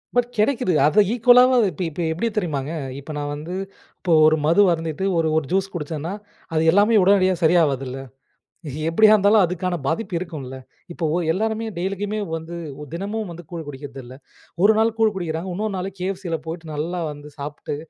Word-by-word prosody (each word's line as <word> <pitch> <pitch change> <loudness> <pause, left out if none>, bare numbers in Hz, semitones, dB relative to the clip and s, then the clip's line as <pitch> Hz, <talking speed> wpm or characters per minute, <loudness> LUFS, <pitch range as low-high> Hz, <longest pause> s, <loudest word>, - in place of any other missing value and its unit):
But 245 -1 +3
கிடைக்குது. 220 -2 +1
அத 205 +8 +5
ஈக்குவலாவது 245 -1 +5
இப்ப - - -9
இப்ப 160 - -6
எப்படி 205 +8 -1
தெரியுமாங்க, 150 -7 -2 0.3
இப்ப 140 - -9
நான் 145 0 -3
வந்து 160 +5 -7 0.5
இப்போ 175 -3 +1
ஒரு 155 0 +5
மது 170 +6 +5
அருந்திட்டு 165 +2 -2
ஒரு 160 -1 +2
ஒரு 155 - 0
ஜூஸ் 195 +1 +1
குடிச்சன்னா, 160 0 -4 0.4
அது 155 - +2
எல்லாமே 205 +4 +4
உடனடியா 190 -1 +4
சரியாவாதுல்ல, 140 -6 +2 0.9
எப்படியா 215 +6 +6
இருந்தாலும் 205 0 +5
அதுக்கான 180 +1 -2
பாதிப்பு 185 +4 -2
இருக்கும்ல, 150 -7 -7 0.4
இப்போ 170 - -3 0.3
எல்லாருமே 220 +4 -1
டெய்லிக்குமே 200 +3 -2 0.2
வந்து, 165 +1 -7 0.3
ஒ - - -6
தினமும் 205 +3 -4
வந்து 175 +1 -9
கூழ் 165 -2 -6
குடிக்கிறதில்ல. 135 -2 -9 0.5
ஒரு 210 - +7
நாள் 225 0 +2
கூழ் 220 -2 +3
குடிக்கிறாங்க. 170 0 -3
இன்னொரு 210 +1 -2
நாள் 185 +1 -3
KFCல 185 -2 -3
போய்ட்டு 160 -1 -6
நல்லா 170 +4 -3
வந்து 145 0 -11
சாப்ட்டு, 145 0 -5
175 Hz, 160 wpm, -22 LUFS, 155-205 Hz, 0.9 s, ஒரு